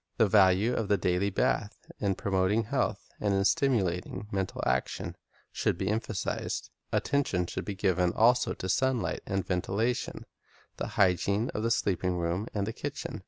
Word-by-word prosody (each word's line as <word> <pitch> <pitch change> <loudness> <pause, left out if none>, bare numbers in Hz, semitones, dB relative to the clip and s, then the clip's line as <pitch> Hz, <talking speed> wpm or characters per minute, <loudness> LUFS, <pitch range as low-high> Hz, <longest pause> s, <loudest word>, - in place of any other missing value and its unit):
The 110 - +5
value 100 +3 +4
of 115 -4 -1
the 100 0 +3
daily 90 +1 +1
bath 105 +2 0 0.2
in 100 -2 +1
promoting 95 +3 +1
health 105 - -1
and 100 -2 +1
in 95 0 +2
stimulating 105 - +1
mental 95 -1 -2
action, 65 0 -1 0.4
should - - 0
be 95 +1 -1
emphasized. 110 -2 -2 0.2
Attention 135 -11 +1
should - - -5
be 100 - -4
given 90 -2 +2
also 120 +4 +3
to 95 - -5
sunlight 130 +4 +1
and 95 -2 -1
ventilation, 100 +6 -1 0.5
the - - -3
hygiene 100 +4 +2
of 105 - -3
the 115 - +1
cleanliness, - - +4
sleeping 90 -2 0
room 85 +5 -1
and 100 -2 -1
the 110 - -4
kitchen. 140 -4 -5
100 Hz, 165 wpm, -29 LUFS, 95-110 Hz, 0.5 s, The